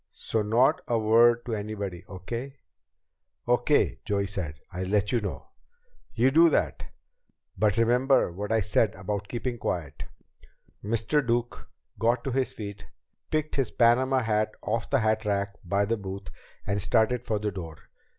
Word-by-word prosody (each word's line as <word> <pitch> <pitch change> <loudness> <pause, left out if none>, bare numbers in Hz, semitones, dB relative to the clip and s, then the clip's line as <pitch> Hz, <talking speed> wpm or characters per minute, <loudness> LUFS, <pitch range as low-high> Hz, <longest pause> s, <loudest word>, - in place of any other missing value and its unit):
So 110 - -2
not 125 +11 +3
a 120 - +1
word 115 +2 +4
to 120 - -3
anybody. 100 -4 -4
Okay?" 115 +9 -6 0.9
"Okay," 125 +4 +2
Joey 100 -2 0
said. 90 -6 -4 0.2
"I'll 90 +1 -3
let 100 +1 +1
you 120 - +1
know." 100 - -6 0.7
"You 125 +3 +3
do 165 +3 +6
that. - - 0 0.7
But 105 0 +1
remember 125 0 +3
what 105 +5 -5
I 110 -1 +3
said 105 +2 +1
about 100 +1 -4
keeping 120 +1 -4
quiet." 75 -8 -4 0.8
Mr. 115 +7 +1
Duke 120 -1 -2 0.3
got 120 +1 +1
to 135 - -2
his 130 +1 0
feet, 100 -1 -8 0.4
picked 155 -1 -1
his 135 - +1
Panama 130 +2 +3
hat 110 -1 0
off 115 +1 -2
the 140 -3 +2
hatrack 105 -2 0
by 100 +3 +1
the 115 +2 0
booth, 95 -2 -7 0.4
and 100 0 -1
started 115 +4 +2
for 110 - +1
the 105 0 -2
door. 85 -4 -7
110 Hz, 150 wpm, -27 LUFS, 100-120 Hz, 0.9 s, do